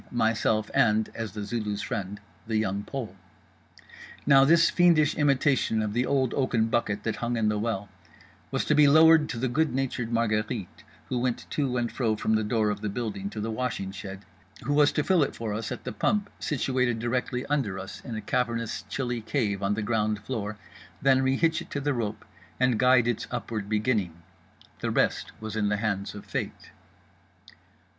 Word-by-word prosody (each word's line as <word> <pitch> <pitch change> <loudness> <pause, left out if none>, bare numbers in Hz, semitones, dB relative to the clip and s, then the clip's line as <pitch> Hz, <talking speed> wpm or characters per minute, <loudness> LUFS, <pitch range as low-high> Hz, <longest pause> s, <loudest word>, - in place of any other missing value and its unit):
myself, 110 -2 +1
and—as 110 -1 +1
The 105 -1 -5
Zulu's 105 -1 -3
friend—The 105 +1 -5
Young 100 -2 0
Pole. 115 -4 -6 1.1
Now 135 -2 +7
this 165 +3 +5
fiendish 165 -4 +4
imitation 140 -5 +2
of 105 -1 -2
The 125 +2 +1
Old 135 -3 +1
Oaken 120 -4 +1
Bucket 105 -3 0
That 110 - -2
Hung 120 0 -2
In 110 -1 +2
The 105 0 0
Well 105 -2 -2 0.6
was - - -1
to - - +2
be 150 -1 +6
lowered 160 +1 +6
to 115 - -4
the 130 +3 0
good 150 +2 0
natured 125 -3 -2
Marguerite 110 -2 -1 0.3
(who 125 - 0
went 125 -1 -1
to 135 -4 0
and 120 -1 -1
fro 115 -4 0
from 110 +1 0
the 110 0 +2
door 105 0 +1
of 105 0 -5
the 105 - -2
building 100 -3 -4
to 105 - -7
the 110 +2 -2
washing 110 -5 -3
shed); 95 0 -8 0.4
who 145 - 0
was 145 0 +5
to 150 - +1
fill 185 -1 +3
it 140 - 0
for 110 -2 -4
us 110 +1 -4
at - - -5
the - - -4
pump 205 - 0
situated 130 -4 0
directly 125 +2 -2
under 130 -10 -1
us 95 +1 -8
in 115 - -6
a 110 - -4
cavernous 115 0 -1
chilly 120 -3 -2
cave 105 -4 -1
on 100 +1 +1
the 105 - -2
ground 110 -1 0
floor, 105 -4 -4 0.4
then 135 -1 +4
rehitch 160 +5 +2
it - - -11
to 145 - -3
the 145 +1 0
rope, 110 -4 -3 0.3
and 125 -3 +2
guide 125 -2 +5
its 120 -3 -1
upward 105 -3 -4
beginning. 105 -6 0 0.6
The - - -2
rest - - 0
was 110 -1 -6
in 105 -2 +1
the 105 - +1
hands 100 -2 -2
of 105 - -9
Fate. - - -5
115 Hz, 185 wpm, -27 LUFS, 105-130 Hz, 1.1 s, Now